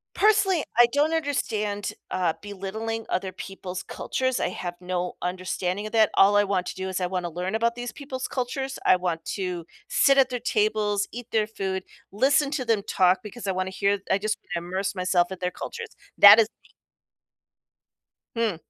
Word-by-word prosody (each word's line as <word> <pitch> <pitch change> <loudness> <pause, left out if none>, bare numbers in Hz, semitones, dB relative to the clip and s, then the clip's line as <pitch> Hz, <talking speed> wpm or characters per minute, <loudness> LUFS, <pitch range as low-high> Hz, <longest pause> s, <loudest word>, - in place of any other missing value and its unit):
personally, 395 -5 +3 0.2
I 240 - +10
don't 300 +3 +2
understand, 215 -10 -1 0.2
uh, 180 -3 +1
belittling 215 +3 -5
other 185 0 -2
people's 185 -1 -7
cultures, 260 -1 -2
I - - +1
have 175 -1 -5
no 180 0 -3
understanding 185 +2 -2
of - - -9
that. 220 -2 +4
All 205 +1 +5
I 205 - +4
want 190 -2 0
to - - -5
do 190 0 -4
is 185 0 -3
I - - +1
wanna 180 -1 -3
learn 180 +4 -4
about 230 +1 +1
these 245 0 -5
people's 265 -3 -6
cultures, 265 +1 -3
I - - +6
want 175 -3 -3
to 180 -4 -3 0.2
sit 275 -1 +4
at 265 -2 +5
their 250 -1 -3
tables, 210 -2 +1
eat 240 0 -8
their 215 -1 +2
food, 190 -3 -3 0.3
listen 270 +6 +3
to 295 -4 -1
them 225 -4 +1
talk 185 0 +3
because 210 +2 -8
I 195 - 0
wanna 185 0 -2
hear 200 +1 +1
I 190 - +4
just 215 +2 -1 0.2
wanna 170 0 -3
immerse 190 +2 -2
myself 180 0 +1
at 185 - -11
their 180 0 -1
cultures. 460 - -7 0.3
That 205 +2 +10
is 220 - +5
the - - -28 1.7
Hmm. 230 -5 +1
205 Hz, 185 wpm, -25 LUFS, 185-240 Hz, 1.7 s, I